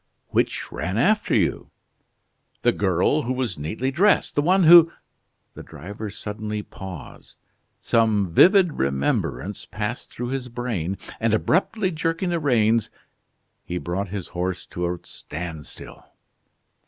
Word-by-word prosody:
"Which - - -1
ran 90 +6 -3
after 210 - +2
you?" - - 0 0.9
"The - - +5
girl 95 - +1
who 130 -2 -2
was 125 - -3
neatly 110 - -2
dressed, 195 +8 +3
the 145 - +2
one 185 +5 +3
who 165 0 +9 0.3
" - - -48
The - - -9
driver 105 +4 -8
suddenly 105 0 -5
paused: 95 -7 -10 0.4
some 110 -4 +2
vivid 185 - +5
remembrance 70 +8 -1
passed 105 +3 -4
through 120 0 -5
his 130 -1 -3
brain, 110 -7 -3 0.2
and, 115 -1 +2
abruptly 190 - +1
jerking 165 +3 -1
the 170 - 0
rains, 115 -6 +2 0.7
he 90 - -4
brought 90 +2 -3
his 100 -2 -5
horse 90 0 -3
to 85 0 -3
a 90 - -4
standstill. 80 -1 -9
110 Hz, 130 wpm, -23 LUFS, 90-145 Hz, 0.9 s, who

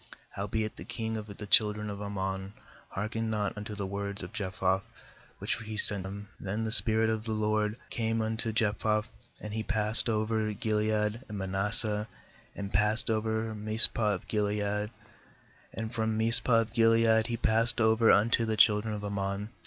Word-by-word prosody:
28Howbeit 110 +2 -3
the - - -9
king 110 -2 -5
of 110 -1 -6
the 105 - -7
children 105 0 +3
of 100 -1 -6
Amrnon 95 -1 -5 0.4
heark 105 +3 -5
ened 115 0 -3
not 105 -2 -2
unto 105 0 -7
the 100 -1 -4
words 100 +1 -5
of - - -9
Jephthah 95 -2 -1 0.6
which - - -2
he 110 -2 -7
sent 100 -2 +4
him. 100 +1 -8
29Then 105 +3 -3
the 110 - -3
spirit 110 0 +6
of 110 -1 -2
the 110 - -3
LORD 105 0 -1
came 115 0 -1
upon 110 0 -2
Jephthah, 110 -1 0 0.4
and 105 0 -8
he 110 - -2
passed 110 +1 +4
over 110 0 -1
Gilead 105 +1 -1
and 105 - -6
Manasseh, 105 +3 -1 0.5
and 100 -1 -7
passed 105 +3 +3
over 110 0 -2
Mizpeh 110 0 +5
of 90 - -11
Gilead, 105 0 -2 0.8
and 110 +1 -6
from 110 -1 -2
Mizpeh 115 +1 +3
of 115 0 -7
Gilead 115 -1 +3
he 120 -1 -3
passed 115 +2 0
over 110 0 +3
un 105 +3 +3
to 115 -2 +1
the 110 -1 -2
children 105 +1 +3
of 105 - -7
Aram 100 -1 -4
on. 100 +2 -4
110 Hz, 175 wpm, -29 LUFS, 105-110 Hz, 0.8 s, spirit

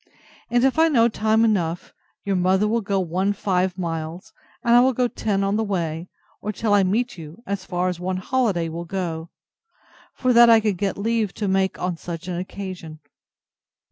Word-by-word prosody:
And 240 0 +2
if 270 +4 +2
I 325 - +6
know 235 -7 +4
time 220 0 +2
enough, 175 -6 -1 0.3
your 200 -1 0
mother 190 +3 +2
will 230 +2 +1
go 195 -1 -1
one 185 +3 0
five 185 -2 0
miles, 165 +3 -5 0.3
and 235 - +3
I 240 - +8
will 260 +1 +4
go 250 +1 +1
ten 200 -4 -1
on 200 +1 +1
the 220 - +1
way, 170 -4 -3 0.3
or 210 - -3
till 215 +1 -1
I 205 - +5
meet 205 +2 0
you, 160 +8 -11
as 200 -1 -4
far 180 +1 -1
as 180 -2 -3
one 185 +1 -2
holiday 190 -5 0
will 165 +1 -6
go; 165 -3 -4 0.9
for 255 -1 +1
that 235 0 +8
I 225 -1 +7
can 215 -2 0
get 195 +2 -2
leave 220 -1 -1
to 210 - -2
make 190 0 +1
on 180 -2 -2
such 170 +1 -7
an 175 -1 -3
occasion. 180 -4 -7
195 Hz, 195 wpm, -23 LUFS, 180-220 Hz, 0.9 s, I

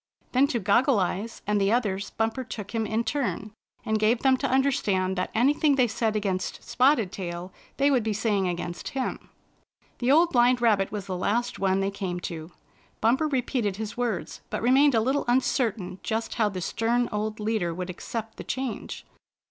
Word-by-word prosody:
Then 265 +2 +4
to 250 - -1
Goggle 235 +4 +3
Eyes 195 +5 -3
and 210 0 +1
the 195 +1 +2
others. 205 -5 0
Bumper 225 +4 -1
took 210 -3 -7
him 225 -1 0
in 220 +2 0
turn, 235 -6 -2 0.3
and 220 0 +1
gave 225 +3 +2
them 265 -1 +5
to 275 0 -1
understand 210 -9 +1
that 185 0 -2
anything 285 +5 +3
they 255 -2 +4
said 220 -1 -1
against 195 -3 -2
Spotted 250 -7 +3
Tail 180 -1 -6 0.2
they 280 +1 +3
would 255 -3 +3
be 220 0 -1
saying 205 -2 0
against 175 0 -4
him. 260 - -3 0.7
The 245 +2 +2
Old 335 +4 +5
Blind 245 0 +4
Rabbit 210 -5 +2
was 205 -3 -4
the 185 - -4
last 235 +7 -1
one 195 0 +2
they 195 +1 0
came 185 -3 -4
to. 165 0 -6 0.5
Bumper 260 +8 +2
repeated 250 -7 -1
his 220 +1 -5
words, 225 -10 -3
but - - -3
re 245 - +3
mained 275 0 +5
a 225 - +4
little 265 +5 0
imcertain 225 -7 0
just 225 +1 -2
how 215 -2 +2
the 185 -2 -5
stem 235 +6 0
old 215 0 -2
leader 210 -5 0
would 180 +2 -4
accept 220 +4 -6
the - - -6
change. 260 -3 -4
220 Hz, 190 wpm, -26 LUFS, 195-250 Hz, 0.7 s, them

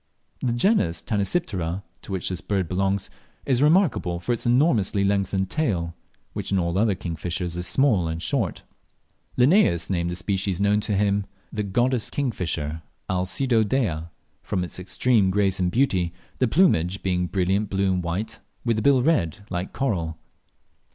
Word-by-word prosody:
The 120 - 0
genus 120 - +2
Tanysiptera, 100 - -1 0.2
to - - -10
which 95 -2 -1
this 90 -2 -4
bird 95 -4 -1
belongs, 95 +2 -1 0.3
is 130 -2 +2
remarkable 150 - +3
for 120 +7 0
the 120 - -2
enormously 120 - +3
lengthened 95 -1 0
tail, 90 - -1 0.4
which - - -4
in 100 - +3
all 85 -1 0
other 105 -2 +2
kingfishers 85 0 -4
is 90 +1 -2
small 115 -11 +2
and 80 0 -3
short. 110 +1 -1 0.7
Linnaeus 125 - +4
named 85 -2 0
the 90 - -3
species 95 0 -1
known 100 +1 +3
to 105 -1 -1
him 100 0 +1 0.3
"the 105 - -1
goddess 120 +4 0
kingfisher" 80 - -2 0.3
(Alcedo 110 +6 +1
dea), 105 - 0 0.4
from 95 -4 -2
its 90 - -5
extreme 95 +3 +2
grace 95 -1 +1
and 90 -1 +2
beauty, 95 -8 +1 0.3
the 130 - +3
plumage 95 - +2
being 90 -1 0
brilliant 95 +3 0
blue 95 -1 +1
and 90 -1 -1
white, 100 +7 -3 0.3
with 115 -2 +1
the - - 0
bill 135 0 +4
red, 100 - +1
like 90 +1 -3
coral. 85 - -2
100 Hz, 160 wpm, -24 LUFS, 90-120 Hz, 0.7 s, Linnaeus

